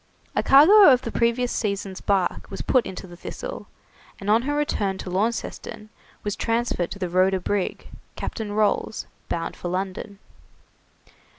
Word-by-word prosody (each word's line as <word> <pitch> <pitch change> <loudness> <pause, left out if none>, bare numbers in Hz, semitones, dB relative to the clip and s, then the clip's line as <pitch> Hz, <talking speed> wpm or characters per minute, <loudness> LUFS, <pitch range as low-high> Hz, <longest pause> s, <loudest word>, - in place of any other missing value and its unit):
A - - +3
cargo 365 +9 +8
of 255 0 +3
the 230 - -4
previous 235 +1 +1
season's 200 -3 -3
bark 195 -3 0
was 195 - -5
put 255 -2 +2
into 190 - -7
the 175 -1 -12
'Thistle', 175 - -7 0.5
and 200 +1 -1
on 225 +2 +5
her 290 +4 -2
return 205 -10 -1
to 185 - -7
Launceston, 215 +1 -3 0.3
was 205 -1 -2
transferred 230 -6 -1
to - - -7
the 185 -2 -2
'Rhoda' 185 +2 +2
brig, 195 +1 -2 0.3
Captain 220 -3 -5
Rolls, 210 +1 0 0.2
bound 165 -1 -3
for - - -6
London. 190 +2 -4
205 Hz, 155 wpm, -24 LUFS, 190-235 Hz, 0.5 s, cargo